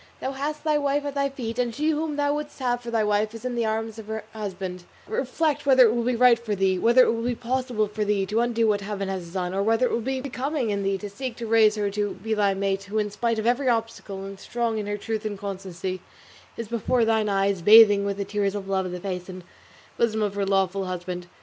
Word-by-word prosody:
Thou 265 - -3
hast 290 +3 -4
thy 305 -1 +2
wife 285 0 0
at 285 - -3
thy 280 0 0
feet, 245 -3 -5
and 240 -2 0
she 305 +2 0
whom 310 0 -2
thou 290 0 +1
wouldst 295 0 -5
have 245 -2 -1
for 240 - -7
thy 225 -2 +1
wife 210 +1 0
is 230 +2 -9
in 250 - -2
the 235 -2 0
arms 220 0 -3
of 215 - -10
her 220 0 -4
husband: 190 -4 -5 0.2
reflect 290 +5 -1
whether 260 -2 +7
it 225 - +3
will 240 - 0
be 245 +1 0
right 240 -1 +5
for 220 -3 -3
thee, 190 -1 +1
whether 240 +5 +6
it - - +2
will 230 - -3
be 240 +1 -1
possible 245 -2 -1
for 210 +1 -3
thee 205 -2 +1
to 210 +4 0
undo 230 -1 +2
what 205 -1 +1
Heaven 200 -1 -4
has 180 -3 -5
done, 180 0 -2
or 195 - 0
whether 225 +4 +2
it - - -1
will 235 - 0
be 265 +3 -2
becoming 265 -1 -2
in 200 0 -1
thee 195 0 0
to 205 - -6
seek 250 +4 -6
to 235 - -6
raise 220 -1 +4
her 205 -1 -1
to 205 0 -2
be 220 +4 -3
thy 200 -2 +2
mate 195 0 -1
who 205 +2 -4
in 210 -1 0
spite 230 +2 -1
of 220 - -2
every 250 +3 +2
obstacle, 225 -4 -2
and 195 0 -8
strong 230 0 -2
in 205 - -4
her 205 0 -2
truth 220 +1 -3
and 210 -2 -3
constancy, 190 -2 -5 0.6
is 230 - -5
before 235 +1 +1
thine 220 -1 +2
eyes, 195 -1 +1
bathing 205 +1 +8
with 200 -1 -2
the 200 - -2
tears 200 0 -1
of 195 -1 -5
love 190 -1 0
the 180 0 -5
face 180 -1 -5
and 185 -1 -8 0.5
bosom 220 -2 +1
of 205 -2 -1
her 200 -1 -1
lawful 195 0 +1
husband. 180 -1 -5
220 Hz, 260 wpm, -25 LUFS, 195-240 Hz, 0.6 s, bathing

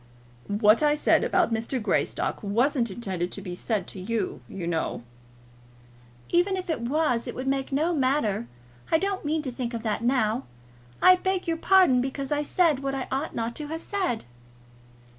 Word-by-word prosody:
"What 210 +3 +4
I 295 -1 +4
said 300 - +3
about 350 -10 +2
Mr. 230 +4 -1
Greystock 215 - -1
wasn't 235 +4 +1
intended 185 -4 -4
to 200 - -3
be 180 -3 -5
said 200 +1 -2
to 195 - -6
you, 215 0 -2
you 185 -3 -6
know." 160 -7 -2 1.3
"Even 365 +2 +2
if 365 -2 -3
it 315 - -2
was 250 -1 0
it - - -5
would 255 - -4
make 270 0 -1
no 310 +6 +1
matter. 255 - +1 0.4
I - - +6
don't 390 +2 -2
mean 305 +1 -1
to 260 - -3
think 240 -1 -4
of 225 - -5
that 220 0 -1
now. 240 -1 +1 0.6
I 370 0 +8
beg 375 0 -1
your 330 -1 0
pardon 360 -9 +5
because 270 +1 -4
I 295 0 +1
said 310 -1 +2
what 275 0 -2
I 265 - -3
ought 275 +4 -2
not 230 0 -2
to 300 - -5
have 320 +2 -5
said." 370 - -2
265 Hz, 180 wpm, -26 LUFS, 225-315 Hz, 1.3 s, I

